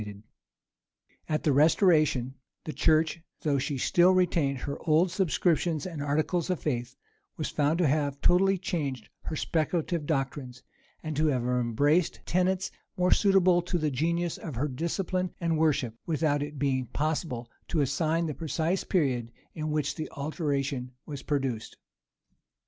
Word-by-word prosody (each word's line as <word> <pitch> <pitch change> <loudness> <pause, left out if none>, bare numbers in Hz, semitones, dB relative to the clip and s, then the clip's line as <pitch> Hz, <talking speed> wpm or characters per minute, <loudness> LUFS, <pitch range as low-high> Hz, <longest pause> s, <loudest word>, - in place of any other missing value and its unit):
And 105 -1 -8 1.1
at 155 -1 0
the 150 - +3
restoration, 150 - +3 0.3
the 155 - -5
church, 160 +1 +2 0.2
though 145 -4 +1
she 140 +1 -2
still 175 +7 +4
retained 170 -7 +2
her 140 - -4
old 165 +4 +4
subscriptions 170 -3 +1
and 165 -5 -5
articles 155 +4 0
of 180 - 0
faith, 125 -3 -3 0.4
was 155 - -2
found 150 +2 +1
to 175 -3 +3
have 140 -1 0
totally 195 +4 +4
changed 145 - -3 0.2
her - - -3
speculative 160 0 -1
doctrines, 135 -4 -3 0.4
and 155 -1 -4
to 155 +1 +3
have 130 -5 +1
embraced 125 +7 +1
tenets 185 +1 +1 0.3
more 180 0 +2
suitable 185 -3 +4
to 175 +1 -2
the 155 -3 0
genius 170 +5 -1
of 155 -6 -6
her 135 +6 0
discipline 175 +6 -2
and 165 -2 0
worship, 140 -7 +1
without 150 -2 +1
its 145 0 -5
being 130 -2 0
possible 145 -5 -2 0.2
to 160 - 0
assign 160 +4 +1
the 155 - -2
precise 165 +4 -1
period 130 - 0 0.2
in 155 -1 -4
which 150 -1 0
the 155 -2 -5
alteration 140 -3 -2
was 145 -3 -6
produced. 135 -6 -2
155 Hz, 150 wpm, -28 LUFS, 140-170 Hz, 1.1 s, still